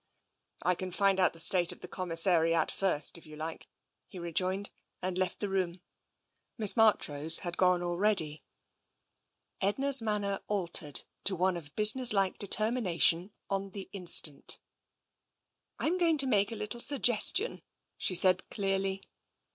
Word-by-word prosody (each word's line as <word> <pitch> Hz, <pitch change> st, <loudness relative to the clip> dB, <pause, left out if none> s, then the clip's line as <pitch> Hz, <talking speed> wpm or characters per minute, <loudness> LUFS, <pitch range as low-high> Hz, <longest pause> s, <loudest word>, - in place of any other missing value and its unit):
" -, -, -36 dB
I 180 Hz, -, +1 dB
can 185 Hz, +1 st, -7 dB
find 195 Hz, +1 st, 0 dB
out 185 Hz, -, +2 dB
the 165 Hz, -, -9 dB
state 175 Hz, +1 st, +4 dB
of -, -, -4 dB
the -, -, -8 dB
commissariat 165 Hz, -2 st, 0 dB
first, 175 Hz, -4 st, +3 dB
if 165 Hz, -, -20 dB
you 155 Hz, -, -12 dB
like," 160 Hz, +1 st, -8 dB, 0.4 s
he -, -, -13 dB
rejoined, 185 Hz, +3 st, -3 dB, 0.3 s
and 185 Hz, 0 st, -5 dB
left 185 Hz, -1 st, -3 dB
the 205 Hz, -, -3 dB
room. 185 Hz, -2 st, -3 dB, 0.8 s
Miss 215 Hz, -4 st, +3 dB
Marchrose 165 Hz, -9 st, +3 dB
had 175 Hz, 0 st, -5 dB
gone 180 Hz, -1 st, +1 dB
already. 175 Hz, -4 st, -1 dB, 1.2 s
Edna's 265 Hz, +7 st, +3 dB
manner 205 Hz, -3 st, -3 dB
altered 170 Hz, -7 st, -2 dB, 0.2 s
to 195 Hz, -, +5 dB
one 185 Hz, +1 st, -1 dB
of 150 Hz, -4 st, -10 dB
businesslike 215 Hz, -3 st, +3 dB
deter 215 Hz, +2 st, +2 dB
mination 180 Hz, -5 st, +1 dB, 0.2 s
on 195 Hz, 0 st, -4 dB
the 195 Hz, -2 st, -9 dB
instant. 170 Hz, -6 st, +2 dB, 0.7 s
" -, -, -44 dB
Tm 355 Hz, +4 st, -1 dB
going 330 Hz, -3 st, +1 dB
to 275 Hz, -, +3 dB
make 205 Hz, -4 st, 0 dB
a -, -, -5 dB
little 220 Hz, +3 st, -3 dB
suggestion," 280 Hz, -, +2 dB, 0.3 s
she 185 Hz, -, -2 dB
said 185 Hz, +1 st, +1 dB
clearly. 195 Hz, -1 st, -3 dB
190 Hz, 145 wpm, -29 LUFS, 170-210 Hz, 1.2 s, to